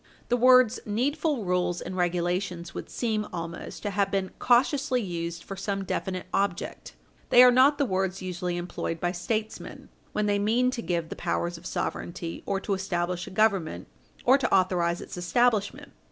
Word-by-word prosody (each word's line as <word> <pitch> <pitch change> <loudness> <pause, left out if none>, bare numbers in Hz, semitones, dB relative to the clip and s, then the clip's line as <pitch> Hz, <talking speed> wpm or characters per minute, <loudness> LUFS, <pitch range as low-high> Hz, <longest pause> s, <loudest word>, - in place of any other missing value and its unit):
The 245 - +3
words 255 -1 +5
"needful 275 - -1
rules 180 -1 0
and 185 - -6
regulations" 175 0 -1
would - - -7
seem 220 -3 -1
also 170 -1 -5
to 205 - -1
have 200 0 +1
been 195 -1 -1
cautiously 260 +2 +3
used 170 -4 -4
for 195 - -7
some 195 0 -3
definite 185 -1 -3
object. 195 -3 -2 0.3
They 245 - +8
are 250 - +8
not 265 +4 +5
the 285 - +2
words 190 -3 -1
usually 180 -1 -3
employed 175 -1 -4
by 175 +1 0
statesmen 215 +5 -4 0.2
when 210 - 0
they 205 -1 +1
mean 235 +5 +2
to 245 - -4
give 170 -1 -2
the - - -5
powers 175 0 -2
of 170 +2 -9
sovereignty, 170 -2 -4
or 195 -1 0
to 205 - -1
establish 180 -2 -2
a - - -6
Government, 195 -5 +1 0.4
or 265 +3 +6
to - - -1
authorize 180 -2 +2
its - - -8
establishment. 215 +3 +1
195 Hz, 170 wpm, -27 LUFS, 175-230 Hz, 0.4 s, They